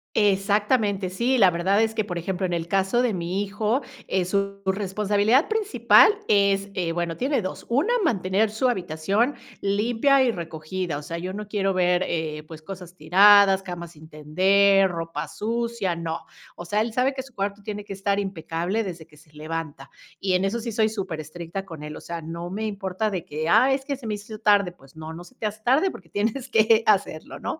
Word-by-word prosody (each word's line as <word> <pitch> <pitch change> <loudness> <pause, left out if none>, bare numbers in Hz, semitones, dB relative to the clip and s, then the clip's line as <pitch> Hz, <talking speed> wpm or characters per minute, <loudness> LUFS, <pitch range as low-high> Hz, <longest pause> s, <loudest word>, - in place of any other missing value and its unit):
Exactamente, 205 -1 +2
sí, 245 +7 +1
la 190 -5 +6
verdad 190 +6 +2
es 220 0 -1
que, 215 - 0
por 175 -4 -5
ejemplo, 180 +2 -3
en 175 - -3
el 170 -1 -2
caso 195 +6 +1
de 235 -4 +1
mi 180 +3 -2
hijo, 210 +6 -1 0.3
eh 185 -2 0
su 200 +1 -1
responsabilidad 205 - +2
principal 435 -1 +5 0.2
es 200 -1 +2
eh 170 -3 -2
bueno, 170 -1 -2
tiene 260 -4 0
2, 185 - -6
una, 305 - +2
mantener 200 - +1
su 220 +4 0
habitación 195 - 0 0.3
limpia 235 +7 +2
y 245 - +2
recogida. 165 -1 -4
O 150 - -8
sea, 170 +3 -5
yo 185 +2 -4
no 210 +1 -6
quiero 195 -2 0
ver, 180 0 +2
eh, 155 -2 -3
pues 155 -1 -11
cosas 180 -2 -9
tiradas, 195 +4 +6
camas 175 -3 -7
sin 155 0 -15
tender, 190 +6 +3
ropa 165 -2 -4
sucia, 230 -2 -2
no. 165 -1 -5 0.3
O 175 - -8
sea, 210 +5 0
él 230 0 -1
sabe 255 +4 +1
que 265 - -4
su 270 -1 -16
cuarto 200 +1 -3
tiene 205 0 -6
que 195 - -6
estar 200 +1 0
impecable 190 +2 -2
desde 170 -4 -7
que 155 -2 -21
se 150 0 -21
levanta 155 -2 -6 0.3
y 190 -2 0
en 180 +1 +2
eso 205 +5 0
sí 230 0 -4
soy 220 0 +2
superestricta 175 -1 -5
con 160 -5 -9
él. 150 0 -7
O - - -9
sea, 170 -1 -6
no 170 +2 -6
me 215 +4 -3
importa 200 0 -2
de 180 -2 -4
que: 155 0 -4
"Ah, 260 +10 +5
es 270 0 -2
que 280 -2 -2
se 250 -4 -9
me 210 - -1
hizo 210 +1 -9
tarde". 200 -3 +3
Pues 135 -5 -21
no, 160 0 -8
no 175 +2 -9
se 255 - -18
te 220 - -5
hace 215 +1 -4
tarde 275 - +3
porque 170 -4 -13
tienes 225 - -2
que 225 0 +4
hacerlo, 190 -6 0
¿no? 320 - -4
195 Hz, 205 wpm, -24 LUFS, 170-215 Hz, 0.3 s, la